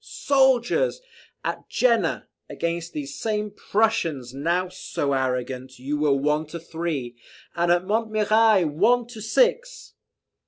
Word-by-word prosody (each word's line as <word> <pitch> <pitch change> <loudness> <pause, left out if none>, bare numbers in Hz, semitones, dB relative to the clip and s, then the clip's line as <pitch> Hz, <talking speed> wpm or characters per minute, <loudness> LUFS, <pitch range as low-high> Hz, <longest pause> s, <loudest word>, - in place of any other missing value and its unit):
"Soldiers! 265 - +2 0.5
at - - -4
Jena, 230 -9 +1 0.2
against 170 0 -3
these 140 -2 -6
same 210 -1 -2
Prussians, 170 - 0
now 170 +6 0
so 145 -5 -3
arrogant, 130 0 -2
you 135 +4 -3
were 150 -1 +2
one 150 +3 0
to 170 +2 -7
three, 160 -7 -4 0.4
and 170 0 +2
at 175 +1 +2
Montmirail 215 -1 +3
one 215 +11 +2
to 225 -3 -9
six! - - 0
175 Hz, 120 wpm, -24 LUFS, 145-225 Hz, 0.5 s, Montmirail